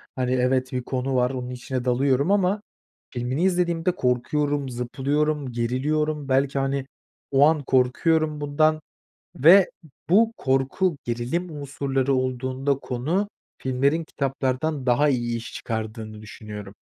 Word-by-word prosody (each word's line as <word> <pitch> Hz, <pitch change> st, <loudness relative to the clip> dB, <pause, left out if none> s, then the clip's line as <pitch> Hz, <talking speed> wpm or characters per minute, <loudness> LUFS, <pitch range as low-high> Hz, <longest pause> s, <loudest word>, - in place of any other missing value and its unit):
hani, 125 Hz, -1 st, -1 dB
evet, 130 Hz, 0 st, +1 dB
bir 125 Hz, -1 st, -2 dB
konu 130 Hz, +1 st, -2 dB
var 125 Hz, 0 st, +3 dB
onun 125 Hz, -2 st, -5 dB
içine 125 Hz, 0 st, -4 dB
dalıyorum 135 Hz, +5 st, +2 dB
ama 200 Hz, +1 st, +2 dB, 0.5 s
filmini 125 Hz, +5 st, -1 dB
izlediğimde 175 Hz, -2 st, +1 dB
korkuyorum, 140 Hz, +3 st, 0 dB
zıplıyorum, 140 Hz, +3 st, -1 dB
geriliyorum 140 Hz, +5 st, -1 dB
belki, 135 Hz, +1 st, +2 dB
hani, 135 Hz, 0 st, -1 dB, 0.5 s
o 140 Hz, +1 st, +6 dB
an 155 Hz, -2 st, +1 dB
korkuyorum 150 Hz, +4 st, +2 dB
bundan. 155 Hz, +2 st, +2 dB, 0.6 s
Ve 175 Hz, +7 st, +7 dB, 0.4 s
bu 225 Hz, +5 st, +5 dB
korku, 135 Hz, +6 st, +1 dB
gerilim 120 Hz, +10 st, -2 dB
unsurları 135 Hz, -1 st, -1 dB
olduğunda 130 Hz, +2 st, 0 dB
konu 155 Hz, +12 st, -1 dB, 0.3 s
filmlerin 140 Hz, +5 st, +1 dB
kitaplardan 135 Hz, 0 st, -2 dB
daha 130 Hz, +4 st, +4 dB
iyi 120 Hz, -3 st, 0 dB
iş 115 Hz, -, -7 dB
çıkardığını 110 Hz, -1 st, -5 dB
düşünüyorum. 105 Hz, -2 st, -9 dB
135 Hz, 120 wpm, -24 LUFS, 125-150 Hz, 0.6 s, Ve